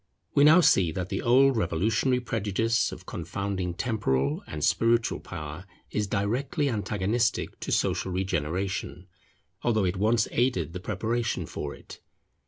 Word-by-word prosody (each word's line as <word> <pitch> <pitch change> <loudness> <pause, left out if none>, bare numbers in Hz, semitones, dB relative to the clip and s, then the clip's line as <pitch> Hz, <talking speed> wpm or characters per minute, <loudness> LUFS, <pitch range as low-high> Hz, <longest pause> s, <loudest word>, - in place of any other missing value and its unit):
We 140 - +5
now 160 +5 +8
see 95 - +4
that 90 +1 -4
the 95 - -2
old 135 +3 +5
revolutionary 110 +8 +1
prejudice 115 0 0
of - - -10
confounding 95 -3 -3
temporal 75 - 0
and 75 -1 -5
spiritual 115 +6 +2
power 80 +1 -8 0.2
is 105 -1 -1
directly 130 - 0
antagonistic 105 +2 -1
to - - -5
social 95 - 0
regeneration, 90 +1 -2 0.6
although 110 -4 +1
it 90 +1 -1
once 110 +3 +2
aided 95 - 0
the 90 - -4
preparation 115 +4 -2
for - - -5
it. - - -13
100 Hz, 135 wpm, -27 LUFS, 90-120 Hz, 0.6 s, now